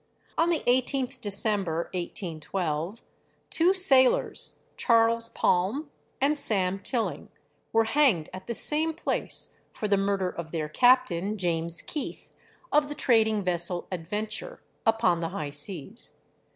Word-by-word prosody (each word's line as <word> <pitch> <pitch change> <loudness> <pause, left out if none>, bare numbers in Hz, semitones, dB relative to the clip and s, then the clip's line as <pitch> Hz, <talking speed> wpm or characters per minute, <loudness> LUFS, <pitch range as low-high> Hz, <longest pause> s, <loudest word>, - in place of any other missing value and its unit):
On 330 +1 +2
the 335 -3 +1
18th 255 +1 0
December, 200 -5 +2
1812, 175 +1 -4 0.5
two 340 +3 +4
sailors, 270 -10 +3
Charles 230 -1 +2
Palm 230 - 0 0.3
and 290 +2 +2
Sam 195 -6 +1
Tilling, 230 +2 -3 0.4
were 225 0 +3
hanged 225 - +2
at 185 0 -9
the 235 - -3
same 315 +5 +1
place 330 - -3
for 210 - -4
the 200 -1 +2
murder 195 -2 0
of 170 -2 -7
their 155 -2 -3
captain, 215 -3 +3
James 170 -2 0
Keith, 300 - -6 0.4
of 295 -1 +3
the 295 - -5
trading 220 -7 +2
vessel 175 0 0
'Adventure,' 210 - -5 0.2
upon 225 -6 +3
the 165 -1 -3
high 150 -3 -5
seas. 170 - 0
210 Hz, 125 wpm, -27 LUFS, 175-255 Hz, 0.5 s, two